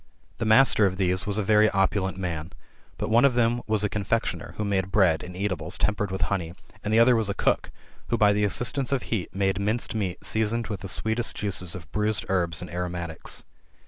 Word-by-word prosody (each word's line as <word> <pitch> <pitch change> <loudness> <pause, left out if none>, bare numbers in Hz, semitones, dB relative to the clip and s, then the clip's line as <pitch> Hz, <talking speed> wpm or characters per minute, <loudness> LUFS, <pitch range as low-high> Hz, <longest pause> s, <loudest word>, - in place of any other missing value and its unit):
The 115 - -1
master 110 -2 +5
of 95 0 -4
these 95 0 +1
was 100 0 +2
a 105 - 0
very 105 +1 +4
opulent 95 -1 0
man. 85 -3 -4 0.4
But - - -3
one 115 +2 +5
of 135 -3 +4
them 120 0 +2
was 110 -1 0
a - - +2
confectioner, 105 +2 -2
who 105 - -2
made 95 -2 -1
bread 90 -6 +3
and 90 0 -9
eatables 90 -4 -2
tempered 105 -1 0
with 95 0 -4
honey; 85 -4 -2 0.3
and 105 - -2
the 110 - +3
other 120 +2 +6
was 110 -3 +2
a 100 - -2
cook, - - 0 0.4
who, 115 - 0
by 105 -1 +4
the 105 0 0
assistance 120 +6 +1
of 135 -2 0
heat, 100 -7 -3
made 95 -1 0
minced 110 +4 -1
meat 100 -5 -3
seasoned 110 +1 0
with 105 -3 -4
the 95 - -7
sweetest 110 +5 +1
juices 90 -4 -1
of 80 -4 -11
bruised 105 +2 +1
herbs 85 -3 0
and 90 - -9
aromatics. 85 -2 -5
100 Hz, 210 wpm, -25 LUFS, 90-110 Hz, 0.4 s, other